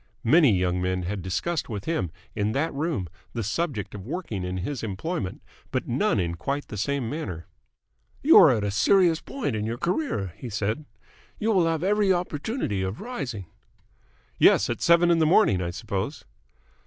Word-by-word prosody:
Many 150 Hz, +4 st, +6 dB
young 90 Hz, -2 st, +1 dB
men 90 Hz, 0 st, -1 dB
had 95 Hz, +2 st, -3 dB
discussed 140 Hz, -, -2 dB
with 105 Hz, -3 st, -5 dB
him 160 Hz, -, -1 dB, 0.3 s
in 105 Hz, 0 st, 0 dB
that 150 Hz, +6 st, 0 dB
room 140 Hz, -, -2 dB, 0.3 s
the 115 Hz, -, -2 dB
subject 120 Hz, -, -2 dB
of 100 Hz, -2 st, -7 dB
working 115 Hz, -, -4 dB
in 90 Hz, +1 st, -3 dB
his 125 Hz, +9 st, -3 dB
employment, 110 Hz, -, -4 dB, 0.3 s
but -, -, -2 dB
none -, -, +1 dB
in 85 Hz, -1 st, -1 dB
quite 140 Hz, +12 st, -3 dB
the -, -, -6 dB
same 130 Hz, +4 st, -1 dB
manner. 100 Hz, -, -5 dB, 0.8 s
"You -, -, +8 dB
are -, -, +8 dB
at 105 Hz, -, +1 dB
a 105 Hz, -, -1 dB
serious 170 Hz, -, +3 dB
point 215 Hz, -, -3 dB
in 105 Hz, -, -2 dB
your 115 Hz, +2 st, -3 dB
career," 170 Hz, -, -1 dB
he 125 Hz, -, -7 dB
said. 110 Hz, +7 st, -2 dB, 0.5 s
"You 220 Hz, +1 st, 0 dB
will 185 Hz, -5 st, +3 dB
have 165 Hz, 0 st, -1 dB
every 205 Hz, 0 st, +3 dB
opportunity 175 Hz, -, -1 dB
of 95 Hz, +3 st, -3 dB
rising." 140 Hz, -, -5 dB, 0.9 s
"Yes. 100 Hz, -, +5 dB
At 120 Hz, -, -4 dB
seven 170 Hz, 0 st, +5 dB
in 170 Hz, -, +3 dB
the 160 Hz, -, +4 dB
morning, 105 Hz, -, +4 dB
I 85 Hz, -, -2 dB
suppose?" 100 Hz, -, -4 dB
120 Hz, 180 wpm, -26 LUFS, -, 0.9 s, You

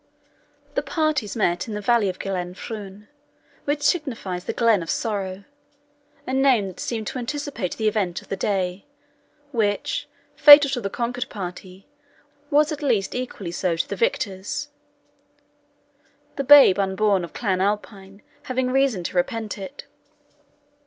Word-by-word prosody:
The -, -, 0 dB
parties 305 Hz, -, -1 dB
met 180 Hz, -4 st, 0 dB
in 215 Hz, -, -5 dB
the -, -, -3 dB
valley 215 Hz, -1 st, +2 dB
of 185 Hz, -, -5 dB
Glenfruin, 195 Hz, +2 st, -6 dB, 0.6 s
which 290 Hz, 0 st, -1 dB
signifies 235 Hz, -, -1 dB
the -, -, -2 dB
Glen 230 Hz, -5 st, +3 dB
of 165 Hz, -, -7 dB
Sorrow 200 Hz, -4 st, -3 dB, 0.8 s
a 260 Hz, -, -4 dB
name 265 Hz, -6 st, +3 dB
that 185 Hz, -, -12 dB
seemed 225 Hz, -2 st, -3 dB
to 255 Hz, -, -5 dB
anticipate 270 Hz, -, -4 dB
the 220 Hz, -, 0 dB
event 195 Hz, -5 st, 0 dB
of -, -, -21 dB
the -, -, -1 dB
day, 190 Hz, +2 st, -2 dB, 0.6 s
which, 210 Hz, -5 st, -1 dB, 0.3 s
fatal 290 Hz, -2 st, +9 dB
to 250 Hz, -3 st, -2 dB
the 200 Hz, -, -3 dB
conquered 245 Hz, +3 st, -3 dB
party, 185 Hz, 0 st, -8 dB, 0.6 s
was 300 Hz, +2 st, +3 dB
at 305 Hz, -, -5 dB
least 230 Hz, -9 st, 0 dB
equally 245 Hz, -8 st, -5 dB
so 175 Hz, 0 st, -1 dB
to 165 Hz, -, -1 dB
the -, -, -4 dB
victors, 260 Hz, -, -2 dB, 1.7 s
the 275 Hz, -, -2 dB
"babe 275 Hz, -8 st, +8 dB
unborn" 195 Hz, 0 st, +1 dB
of 170 Hz, -, -8 dB
Clan 190 Hz, -5 st, -1 dB
Alpine 200 Hz, -1 st, -3 dB, 0.2 s
having 255 Hz, -1 st, -1 dB
reason 265 Hz, -8 st, +1 dB
to 170 Hz, -, -5 dB
repent 215 Hz, +4 st, -1 dB
it. 270 Hz, +9 st, -8 dB
210 Hz, 145 wpm, -23 LUFS, 190-260 Hz, 1.7 s, fatal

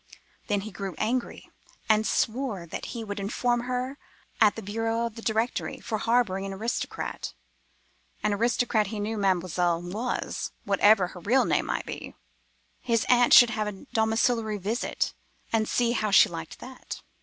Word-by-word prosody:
Then 205 Hz, -1 st, +1 dB
he 215 Hz, +2 st, -7 dB
grew 195 Hz, -1 st, -5 dB
angry, 235 Hz, +3 st, -2 dB, 0.4 s
and 215 Hz, 0 st, +3 dB
swore 225 Hz, -6 st, -1 dB
that 165 Hz, -, -6 dB
he 235 Hz, -2 st, -5 dB
would 205 Hz, -1 st, -5 dB
inform 240 Hz, +4 st, 0 dB
against 245 Hz, -, -8 dB
her 255 Hz, +2 st, -2 dB, 0.4 s
at 215 Hz, -2 st, +6 dB
the 225 Hz, -, -7 dB
bureau 225 Hz, +3 st, -1 dB
of 230 Hz, -, -4 dB
the 230 Hz, -, -9 dB
Directory, 225 Hz, +2 st, -1 dB
for 220 Hz, -2 st, -3 dB
harbouring 225 Hz, -5 st, +1 dB
an 195 Hz, 0 st, -4 dB
aristocrat; 225 Hz, +5 st, -4 dB, 0.9 s
an 210 Hz, -, +2 dB
aristocrat 225 Hz, 0 st, +1 dB
he 210 Hz, +1 st, -5 dB
knew 215 Hz, +2 st, -2 dB
Mademoiselle 180 Hz, -3 st, +1 dB
was, 200 Hz, +8 st, -3 dB
whatever 200 Hz, -1 st, +4 dB
her 180 Hz, -, -10 dB
real 235 Hz, +10 st, +3 dB
name -, -, +1 dB
might -, -, -2 dB
be. -, -, -7 dB, 0.6 s
His 230 Hz, -2 st, 0 dB
aunt 245 Hz, -1 st, +5 dB
should 240 Hz, -1 st, +9 dB
have 215 Hz, -2 st, -1 dB
a 200 Hz, -2 st, -7 dB
domiciliary 220 Hz, 0 st, +1 dB
visit, 210 Hz, +5 st, -2 dB, 0.4 s
and 220 Hz, -1 st, +2 dB
see 240 Hz, -1 st, +2 dB
how 215 Hz, -3 st, 0 dB
she 205 Hz, +2 st, +7 dB
liked 165 Hz, -2 st, -7 dB
that. 255 Hz, 0 st, -9 dB
220 Hz, 165 wpm, -27 LUFS, 200-235 Hz, 0.9 s, should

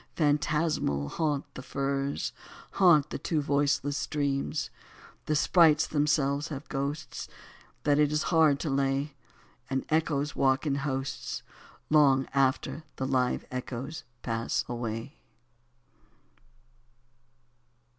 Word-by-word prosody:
Phantasmal 150 Hz, -, +1 dB
haunt 150 Hz, -, -1 dB
the -, -, -7 dB
firs, 140 Hz, +1 st, -2 dB, 0.4 s
Haunt 165 Hz, -6 st, +5 dB
the -, -, -4 dB
two 160 Hz, -, 0 dB
voiceless 145 Hz, 0 st, +1 dB
streams: 145 Hz, 0 st, -1 dB, 0.6 s
The 155 Hz, -, +1 dB
sprites 155 Hz, -1 st, +5 dB
themselves 145 Hz, -1 st, +1 dB
have 145 Hz, -2 st, -7 dB
ghosts 145 Hz, +2 st, -4 dB, 0.6 s
That 145 Hz, 0 st, +3 dB
it 150 Hz, -1 st, +4 dB
is 150 Hz, 0 st, +1 dB
hard 155 Hz, -4 st, +5 dB
to 160 Hz, -, -2 dB
lay, 135 Hz, +1 st, 0 dB, 0.6 s
And 135 Hz, 0 st, -1 dB
echoes 150 Hz, -2 st, 0 dB
walk 135 Hz, +2 st, +2 dB
in 145 Hz, -, +1 dB
hosts 140 Hz, -1 st, -3 dB, 0.5 s
Long 135 Hz, -3 st, +5 dB
after 135 Hz, +3 st, +1 dB
the 130 Hz, -, -3 dB
live 130 Hz, -2 st, 0 dB
echoes 130 Hz, +4 st, -5 dB, 0.2 s
pass 115 Hz, -1 st, -1 dB
away. 120 Hz, +3 st, -5 dB
140 Hz, 105 wpm, -29 LUFS, 135-150 Hz, 0.6 s, Haunt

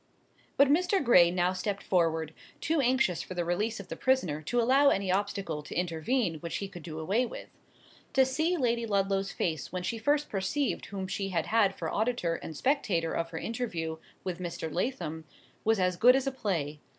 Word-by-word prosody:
But 280 Hz, -, +6 dB
Mr. 360 Hz, +5 st, +2 dB
Gray 180 Hz, -9 st, +6 dB
now 180 Hz, +1 st, +1 dB
stepped 195 Hz, +2 st, -3 dB
forward, 165 Hz, -3 st, +1 dB, 0.3 s
too 320 Hz, -1 st, +1 dB
anxious 245 Hz, -8 st, +2 dB
for 185 Hz, -, -8 dB
the 175 Hz, -1 st, -1 dB
release 210 Hz, +6 st, -1 dB
of 200 Hz, -, -8 dB
the -, -, -5 dB
prisoner 185 Hz, -, +1 dB
to 240 Hz, +10 st, -1 dB
allow 265 Hz, +4 st, +5 dB
any 195 Hz, -5 st, +1 dB
obstacle 195 Hz, -5 st, -1 dB
to 145 Hz, -, -9 dB
intervene 175 Hz, +2 st, 0 dB
which 170 Hz, +2 st, -5 dB
he 200 Hz, -, -4 dB
could 180 Hz, -3 st, -10 dB
do 155 Hz, -1 st, -7 dB
away 195 Hz, +10 st, +1 dB
with. -, -, -9 dB, 0.6 s
To 265 Hz, -1 st, +5 dB
see 315 Hz, +7 st, 0 dB
Lady 235 Hz, -4 st, 0 dB
Ludlow's 195 Hz, -1 st, 0 dB
face 160 Hz, -3 st, -2 dB
when 180 Hz, -1 st, -3 dB
she 225 Hz, +6 st, -2 dB
first 290 Hz, +5 st, +1 dB
perceived 205 Hz, +9 st, -1 dB
whom 195 Hz, -2 st, -5 dB
she 195 Hz, +1 st, -3 dB
had 170 Hz, -4 st, -1 dB
had 210 Hz, -3 st, +2 dB
for -, -, -4 dB
auditor 220 Hz, -6 st, 0 dB
and 160 Hz, -, -8 dB
spectator 220 Hz, -, +1 dB
of 165 Hz, 0 st, -2 dB
her 165 Hz, -, -6 dB
interview 175 Hz, -8 st, -3 dB, 0.3 s
with 185 Hz, -2 st, -4 dB
Mr. 170 Hz, -3 st, -5 dB
Lathom, 170 Hz, -, -3 dB, 0.4 s
was 220 Hz, -1 st, +2 dB
as 180 Hz, -1 st, +1 dB
good 250 Hz, +7 st, +7 dB
as 270 Hz, 0 st, +1 dB
a 270 Hz, -, 0 dB
play. 165 Hz, -, -2 dB
195 Hz, 195 wpm, -29 LUFS, 170-245 Hz, 0.6 s, good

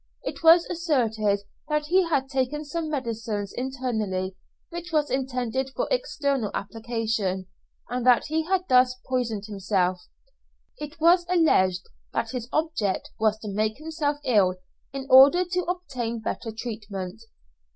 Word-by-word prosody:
It -, -, -5 dB
was 330 Hz, +1 st, +7 dB
asserted 225 Hz, -, 0 dB, 0.3 s
that 300 Hz, 0 st, 0 dB
he 355 Hz, +2 st, +3 dB
had 270 Hz, -4 st, +1 dB
taken 270 Hz, +2 st, -1 dB
some 315 Hz, +2 st, -3 dB
medicine 230 Hz, -7 st, -3 dB
internally 220 Hz, -8 st, -2 dB, 0.4 s
which 345 Hz, 0 st, -6 dB
was 300 Hz, -2 st, +1 dB
intended 260 Hz, 0 st, -1 dB
for -, -, -1 dB
external 280 Hz, -, 0 dB
application, 220 Hz, -3 st, -2 dB, 0.4 s
and 250 Hz, +1 st, -3 dB
that 245 Hz, -1 st, +5 dB
he 315 Hz, +1 st, -1 dB
had 375 Hz, +1 st, +1 dB
thus 255 Hz, 0 st, +5 dB
poisoned 235 Hz, -5 st, -1 dB
himself; 190 Hz, -3 st, 0 dB, 0.8 s
it 300 Hz, +2 st, -8 dB
was 345 Hz, +2 st, +5 dB
alleged 190 Hz, -, +3 dB, 0.3 s
that -, -, -1 dB
his 245 Hz, -2 st, -5 dB
object 310 Hz, -12 st, -1 dB
was 220 Hz, -1 st, +2 dB
to 215 Hz, -, -7 dB
make 215 Hz, +2 st, 0 dB
himself 305 Hz, -1 st, -2 dB
ill 200 Hz, -8 st, +3 dB, 0.4 s
in 270 Hz, -1 st, -5 dB
order 280 Hz, +8 st, +7 dB
to 360 Hz, +1 st, -1 dB
obtain 270 Hz, -11 st, -3 dB
better 225 Hz, +1 st, -4 dB
treatment. 215 Hz, -3 st, -6 dB
255 Hz, 135 wpm, -26 LUFS, 220-310 Hz, 0.8 s, was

